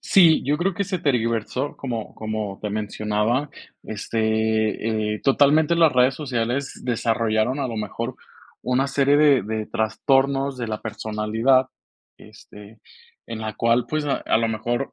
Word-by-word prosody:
Sí, 170 -5 +5
yo 145 +2 +1
creo 185 +1 0
que 200 - -1
se 185 -1 -3
tergiversó, 125 0 -1
como 120 -5 -5
como 110 -2 -4
te 105 - -4
mencionaba, 105 +5 -1 0.3
este, 110 0 -1
eh, 105 - -7
totalmente 145 +4 +4
las 165 -3 +5
redes 125 +1 +3
sociales 130 -1 -3
desarrollaron, 115 +1 0
a 130 - -1
lo 115 - -5
mejor, 105 -2 -4 0.5
una 125 +2 +1
serie 140 +1 +2
de 145 -3 +5
de 110 +1 -4
trastornos 135 +4 +1
de 120 - -3
la 110 -1 -4
personalidad, 110 +5 0 0.5
este, 105 +1 -15 0.5
en 110 -1 -6
la 110 -1 -4
cual, 115 +2 +1
pues, 155 -1 -1
a 145 - 0
a - - +2
lo 115 0 0
mejor 120 +4 -2
115 Hz, 150 wpm, -23 LUFS, 110-140 Hz, 0.5 s, Sí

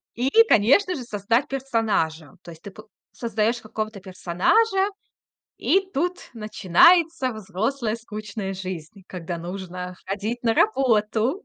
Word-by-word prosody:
И, 250 +3 0 0.2
конечно 285 - +4
же, 260 - -6
создать 230 +3 0
персонажа. 220 - -1
То 170 - -10
есть 165 -1 -15
п 200 - -8
ты 215 +2 -13 0.3
создаёшь 230 0 -1
какого-то 215 -1 -5
персонажа, 200 - +1 0.7
и 385 - +3
тут 355 +5 -2
начинается 255 - +3
взрослая 220 +4 -2
скучная 210 -3 -6
жизнь, 185 0 -7
когда 175 -1 -5
нужно 180 +1 -6
ходить 210 +5 -3
на 230 -2 +2
работу, 240 - +1
215 Hz, 120 wpm, -23 LUFS, 190-255 Hz, 0.7 s, конечно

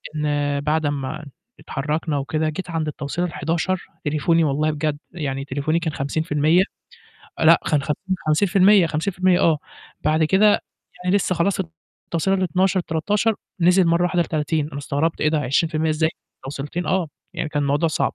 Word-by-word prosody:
إن 145 -1 0
بعد 155 +1 0
أمّا 145 +2 -3 0.3
اتحرّكنا 150 +2 -2
وكده، 155 +3 -1
جيت 175 +4 -6
عند 160 -2 -2
التوصيلة 150 +4 -3
ال11 170 +4 -1 0.2
تليفوني 160 +3 +2
والله 150 +2 +1
بجد، 150 -1 -2
يعني 135 -5 -4
تليفوني 145 +4 -1
كان 160 -3 -3
50% 155 +4 +2 0.8
آه، - - 0
لأ، 165 +1 +7
كان 145 -2 +2
50- 185 +6 -2
50%، 190 +3 +5
50% 180 +3 +1
آه، 160 -3 +3 0.5
بعد 155 +1 +3
كده 190 +6 +4 0.6
يعني 185 +2 +3
لسه 185 -2 0
خلاص 190 +4 +1 0.4
التوصيلة 190 +4 0
ال12، 185 +1 +1
ال13، 205 +7 0 0.3
نزِل 180 +1 +5
مرّة 170 +1 +3
واحدة 175 -1 +2
ل30، 155 -2 -1
أنا 140 - -7
استغربت 145 +3 -1
إيه 155 - +3
ده؟! 155 0 +1
20% 155 +3 +1
إزاي 160 +1 +1 0.3
توصيلتين 145 +6 -4
آه، 185 -4 0 0.3
يعني 155 - -2
كان 145 -1 -1
الموضوع 145 +4 +1
صعب. - - -1
160 Hz, 155 wpm, -22 LUFS, 150-175 Hz, 0.8 s, لأ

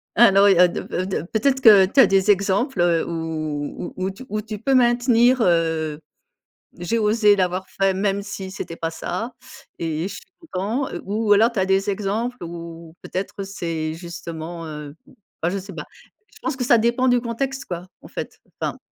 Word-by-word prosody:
Alors, 200 -3 +6
il 195 - +5
y - - +3
a 180 - +8
2 175 - -5
fa 185 - -2
2 185 -4 -3
peut-être 265 +6 +1
que, 210 -6 +8
tu 215 +9 0
as - - +8
des 195 +1 +4
exemples, 200 - +1
heu, 170 -2 +2
où 160 -2 -4
où 185 +1 -2
tu 230 +7 -12
où 215 +1 -3
tu 210 -1 -7
peux 270 +4 0
maintenir, 245 0 +4
heu: 160 -5 +1 0.8
«J'ai 180 +7 -1
osé 210 -1 +4
l'avoir 185 0 -1
fait, 195 0 +1
même 200 0 0
si 200 -2 -7
c'était 170 -3 -6
pas 165 -1 -3
ça 185 +8 -4 0.5
et 160 -1 -2
je - - -7
suis - - -9 0.3
content» 220 +9 -1 0.2
ou 210 +1 -1
alors 220 +3 +5
tu - - -9
as 190 - +2
des 195 +1 +1
exemples 215 +5 -2
où 165 -1 -8
peut-être, 195 +1 -5
c'est 165 -5 -4
justement, 170 -1 -7
heu, 150 -1 -7 0.5
enfin, 165 - +1
je 185 - -3
ne 195 - -3
sais 195 0 -10
pas. 150 -2 -7 0.5
Je - - -16
pense 315 - -1
que 255 - -1
ça 240 - +5
dépend 235 +3 +2
du 245 -1 +3
contexte 265 +3 -3
quoi, 175 0 -6
en - - -12
fait, - - -7 0.2
enfin. - - -2
195 Hz, 195 wpm, -22 LUFS, 170-225 Hz, 0.8 s, a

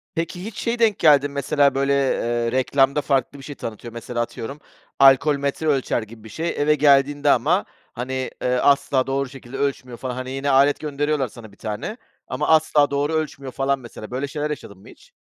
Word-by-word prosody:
Peki, 170 +2 -3
hiç, 220 -1 -7
şeye 235 +1 -2
denk 220 -4 +3
geldin 145 -3 +5
mi? - - -13
Mesela 140 0 +2
böyle, 140 +1 +1
eee, 120 -4 0
reklamda 135 +2 +2
farklı 140 0 -1
bir 135 - -11
şey 145 -1 -8
tanıtıyor. 115 +1 -7
Mesela 120 +1 -4
atıyorum, 120 +4 -6 0.4
alkol 135 +2 +6
metre 140 +3 -2
ölçer 135 -4 +1
gibi 110 0 -12
bir 110 - -11
şey 165 +10 -3
eve 150 0 +2
geldiğinde 145 0 +3
ama, 155 - +3 0.3
hani, 130 +1 -4
eee, 125 0 +1
asla 140 -1 +2
doğru 135 0 -1
şekilde 135 -1 -10
ölçmüyor 135 -3 -3
falan. 125 0 -5
Hani, 130 0 -5
yine 135 +1 -2
alet 140 +2 +4
gönderiyorlar 145 -2 -1
sana 110 -1 -13
bir 100 - -20
tane 110 - -5 0.3
ama 150 - -2
asla 155 -2 +4
doğru 145 +2 0
ölçmüyor, 150 -4 -3
falan, 135 +1 0
mesela. 120 -2 -10
Böyle 135 +3 -2
şeyler 150 +1 -3
yaşadın 100 -9 -7
mı - - -17
hiç? - - -17
140 Hz, 195 wpm, -22 LUFS, 125-145 Hz, 0.4 s, alkol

